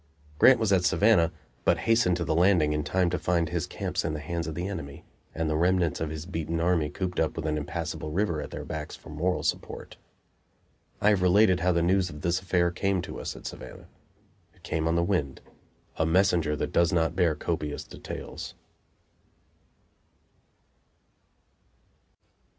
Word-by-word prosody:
Grant 130 -2 +7
was 110 -3 +2
at 90 -2 +3
Savannah, 90 -3 +4 0.3
but - - +3
hastened 115 -6 +3
to 85 - -2
the 80 - 0
Landing 85 -3 +4
in 75 0 -1
time 90 +3 +1
to 90 - -1
find 85 0 +1
his 85 -2 -2
camps - - -3
in 80 - -2
the - - -4
hands 85 +2 -4
of 80 - -5
the 90 +3 -3
enemy 75 -8 -7 0.3
and 80 0 -1
the 80 - 0
remnants 85 -1 +2
of 80 - -1
his 80 0 -6
beaten 85 -2 -3
army 85 -3 +2
cooped 90 +4 -3
up 80 - 0
with 80 - -4
an 75 -1 0
impassable 75 +1 -4
river 85 -2 0
at - - -6
their - - -7
backs 75 -1 -5
for - - -14
moral 90 +5 -1
support. - - -4 1.0
I 105 - +5
have 100 -3 +3
related 90 0 +4
how 90 +2 +2
the 85 -1 +1
news 90 +1 +2
of 75 -2 -9
this 85 +1 +1
affair 90 -2 +1
came 95 0 0
to - - -7
us - - -5
at - - -12
Savannah. - - -9 0.7
It - - -26
came 80 0 -1
on 80 - +1
the 85 - +2
wind 85 -8 -1 0.6
a 80 - +2
messenger 85 -3 +3
that - - -3
does 85 -1 +3
not 85 -1 +1
bear 85 -4 +2
copious 75 -1 -3
details. - - -8
85 Hz, 180 wpm, -27 LUFS, 80-90 Hz, 1.0 s, Grant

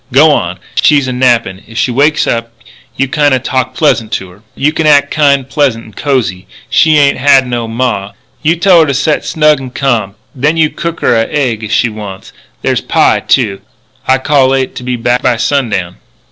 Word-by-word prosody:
"G'wan 140 - +3
up. 90 - -22 0.2
She's 145 -3 +3
a 130 - -3
nappin'. 120 -7 0
If 115 - -11
she 125 - 0
wakes 145 +5 +2
up 115 0 -2 0.5
you 135 - 0
kinda 145 -1 +2
talk 130 0 -2
pleasant 115 -8 +1
to 95 -1 -4
her. 95 +3 -19
You 150 +2 0
act 145 -2 +3
kind 140 -3 +2
pleasant 135 -5 -1
and 110 - -16
cosy. 115 -10 -2 0.2
She 155 -1 +4
ain't 140 -2 +2
had 135 -1 +4
no 120 -2 -3
ma. 115 -4 -2 0.3
You 160 +2 +2
tell 175 0 +4
her 160 - +3
to 140 - -1
set 150 +3 0
snug 150 -2 +2
and 130 -2 -9
ca'm. 115 -8 -1 0.2
Then 150 +5 0
you 155 -1 +2
cook 170 0 -5
her - - +2
a 115 0 +1
egg 125 -7 -2
if 110 - -6
she 120 +2 +2
wants 105 -3 -8
it. - - -21 0.3
There's - - 0
pie, - - +2
too. 105 -7 0 0.5
I 130 - +4
cal'late 135 -1 +1
to - - -7
be 125 0 -2
back 120 +1 0
by 120 -3 +1
sundown." 110 -9 -1
130 Hz, 200 wpm, -11 LUFS, 115-145 Hz, 0.5 s, She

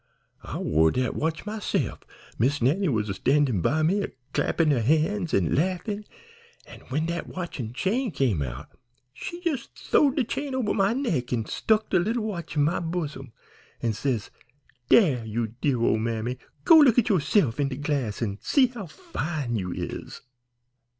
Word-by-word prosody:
I - - -6
wore 80 +1 +3
dat 125 +5 0
watch 160 +2 -2
myse'f; 210 0 -2 0.4
Miss 140 +6 +2
Nannie 155 +10 +2
was 105 -6 -1
standin' 135 -7 +2
by 155 - +1
me, 190 +6 +2
a - - -1 0.3
clappin' 160 -3 +2
her 130 -5 +2
han's 160 - +1
an' 90 -5 +2
laughin', 185 +6 -1 0.6
an' - - -12
when 150 +5 0
dat 170 0 -3
watch 175 -5 -6
an' 115 -3 -4
chain 225 - 0
came 130 - 0
out 65 +1 -5 0.4
she 345 - -7
jes' 275 -7 -2
th'owed 280 -2 +2
de 275 - +2
chain 275 +3 -3
over 245 -6 0
my 195 0 +2
neck 230 - -1
an' 115 -3 0
stuck 215 - 0
de 185 - +4
leetle 225 +6 0
watch 175 -8 -5
in 145 - +3
my 165 +5 +1
bosom, 155 -7 -4 0.5
an' 115 -2 +1
says, 115 -2 -2 0.6
'Dere, 145 - +5
you 110 +1 -2
dear 135 -5 +1
ole 115 -1 +2
mammy, 115 +2 -2 0.3
go 330 -2 +9
look 260 -6 +6
at 245 -1 +4
you'se'f 160 - +2
in 140 - +2
de 135 - -4
glass 135 -6 -2
an' 100 -2 -3
see 275 -3 +4
how 240 -7 -6
fine 155 - -4
you 90 -4 -2
is.' - - -6
150 Hz, 175 wpm, -26 LUFS, -, 0.6 s, go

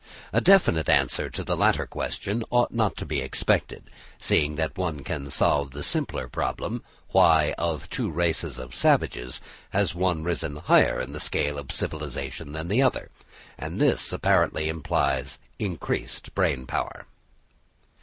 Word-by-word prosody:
A - - +3
definite 175 - +5
answer - - +2
to - - -5
the - - 0
latter - - +2
question 110 +4 -3
ought 120 0 +2
not 110 -3 0
to - - -5
be 75 -3 -2
expected, 65 - 0 0.4
seeing 75 +1 +2
that 80 +3 -2
no 95 - -3
one 75 -5 -4
can 70 -2 -4
solve 70 +1 +2
the 70 +2 -7
simpler 65 - +1
problem, - - -3 0.3
why, 80 -2 +5
of 85 -3 -2
two - - -2
races 80 -5 -1
of 65 -1 -8
savages, 60 +1 +1 0.5
one 90 -1 +1
has 80 - -6
risen 85 -4 -2
higher 75 +3 +4
in 65 +3 -5
the 75 - -5
scale 75 -1 0
of 70 - -7
civilisation 75 -1 -4
than 80 +2 -5
the 110 +8 +2
other; 130 -2 +1 0.5
and - - -5
this - - +2
apparently 80 0 +2
implies 70 -4 -1 0.2
increased 95 -6 -3
brain 65 -2 +1
power. - - -4
75 Hz, 155 wpm, -26 LUFS, 70-85 Hz, 0.5 s, definite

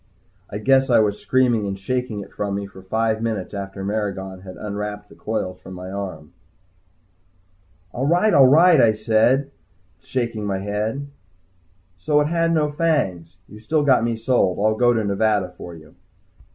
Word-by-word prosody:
I 100 - -5
guess 135 +4 +3
I 120 - +5
was 105 -1 +2
screaming 120 -5 +1
and 95 0 -4
shaking 115 +1 -3
it - - -12
from 100 -1 -3
me 100 0 -3
for 95 -1 -13
five 110 +3 -1
minutes 110 -5 -3
after 95 -1 -6
Maragon 95 -3 -3
had 95 -1 -10
unwrapped 105 0 -5
the - - -16
coils 95 -4 -4
from 95 0 -10
my 90 +1 -8
arm. 95 -6 -6 1.6
"All 130 +6 -2
right. 180 +7 +3
All 135 -2 +7
right. 165 +5 +6
All - - +3
right," - - +7
I 110 -2 +5
said 110 +4 +3
to - - -5
him, 140 - -22 0.5
shaking 120 -4 -3
my 95 -1 -1
head. 105 +7 -3 0.9
"So 150 +8 +2
it 150 0 +1
had 165 0 +1
no 150 -2 +1
fangs. 95 - -1
You've 105 0 -13
still 150 +7 0
got 130 -5 +4
me 115 0 0
sold. 110 -6 +1
I'll 110 +2 +2
go 120 +2 +3
to 115 -2 0
Nevada 100 -2 0
for 85 -1 -9
you." 80 -1 -15
110 Hz, 185 wpm, -22 LUFS, 100-130 Hz, 1.6 s, All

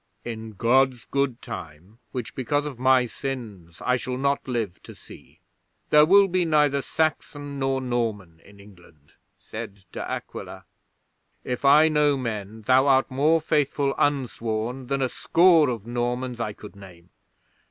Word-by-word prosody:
'"In 110 -2 -6
God's 125 +4 +2
good 140 -3 -2
time, 85 +8 -9
which 125 -3 -5
because 145 +3 -1
of 140 -5 -7
my 130 -1 +4
sins 110 -10 -7
I 125 0 +2
shall 125 0 -4
not 140 +1 -1
live 115 -7 -3
to - - -12
see, - - -16 0.5
there 150 0 +7
will 200 +2 +6
be 185 -1 +1
neither 150 -4 +2
Saxon 145 -2 -2
nor 135 0 0
Norman 110 -9 -3
in 100 0 -18
England," 90 -7 -19 0.2
said 100 -1 -9
De - - -6
Aquila. - - -7 0.8
"If 125 +1 -4
I 150 +3 +7
know 150 -2 +2
men, 110 -3 -5
thou 130 +4 +4
art 135 0 +3
more 150 +5 +3
faithful 145 -2 0
unsworn 125 -3 -1
than 135 0 -1
a - - +2
score 165 +1 +4
of 115 -4 -4
Normans 120 +1 -3
I 110 -3 -3
could 105 0 -12
name. 90 -4 -15
125 Hz, 150 wpm, -24 LUFS, 110-140 Hz, 0.8 s, there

